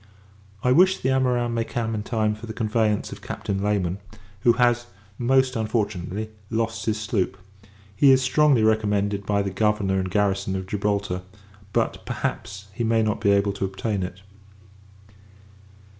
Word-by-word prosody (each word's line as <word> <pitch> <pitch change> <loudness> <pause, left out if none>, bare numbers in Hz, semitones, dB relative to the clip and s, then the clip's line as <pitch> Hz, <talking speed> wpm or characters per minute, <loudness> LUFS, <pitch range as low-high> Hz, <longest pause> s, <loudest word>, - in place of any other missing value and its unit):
I 125 - +3
wish 185 +7 +5
the 130 - -1
amorins 125 -2 +1
may 115 -1 0
come 115 -1 -3
in 105 - -2
time 110 -1 0
for 110 +2 -9
the 110 - -5
conveyance 110 -1 0
of - - -9
Captain 95 -1 -4
Layman; 100 -3 0 0.4
who 120 +4 +4
has, 120 0 +2 0.3
most 130 +1 +3
unfortunately, 110 -2 -2 0.2
lost 115 0 -2
his 110 -1 0
sloop: 105 -3 -1 0.6
he 140 +7 +5
is 130 - +6
strongly 135 -2 +4
recommended, 105 -2 +1
by 100 -1 +2
the 100 - -3
governor 105 -1 +1
and 95 0 -2
garrison 95 -1 0
of 95 0 -3
Gibraltar. 100 -1 -1 0.5
But, - - -1
perhaps, 100 0 -4
he 120 - -3
may 115 0 +2
not 110 0 -1
be 100 - +3
able 100 0 +3
to 100 - -2
obtain 95 +1 -2
it. 90 +1 -6
105 Hz, 160 wpm, -24 LUFS, 100-115 Hz, 0.6 s, is